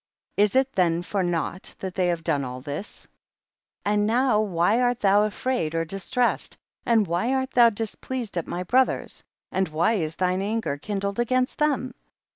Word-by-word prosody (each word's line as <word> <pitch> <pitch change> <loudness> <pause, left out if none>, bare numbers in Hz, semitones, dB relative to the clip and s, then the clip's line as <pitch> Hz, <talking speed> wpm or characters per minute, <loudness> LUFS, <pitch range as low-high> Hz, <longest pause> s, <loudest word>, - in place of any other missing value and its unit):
Is 205 +3 +3
it 265 0 +3
then 175 -3 +2
for 195 +2 -1
nought 175 +1 -2
that 190 -1 -5
they 180 -1 +1
have 170 -2 -1
done 150 -4 +1
all 125 0 -5
this? 145 - -6 0.8
54. 205 - +2
And 205 0 +2
now 235 -1 +3
why 205 +3 +2
art 245 -1 +1
thou 200 0 +5
afraid 215 -6 -2
or 165 0 0
distressed, 195 +8 -1 0.3
and 230 -3 +4
why 180 +8 0
art 260 0 -1
thou 240 -2 +6
dis 220 0 -3
pleased 250 -7 -5
at 170 - -2
my 180 - -3
brothers, 255 +8 +1 0.3
and 190 0 0
why 160 +8 +1
is 160 -7 -2
thine 185 0 0
anger 210 -8 -2
kindled 200 +3 -3
against 255 +2 0
tliem 285 -4 0
200 Hz, 180 wpm, -25 LUFS, 175-240 Hz, 0.8 s, thou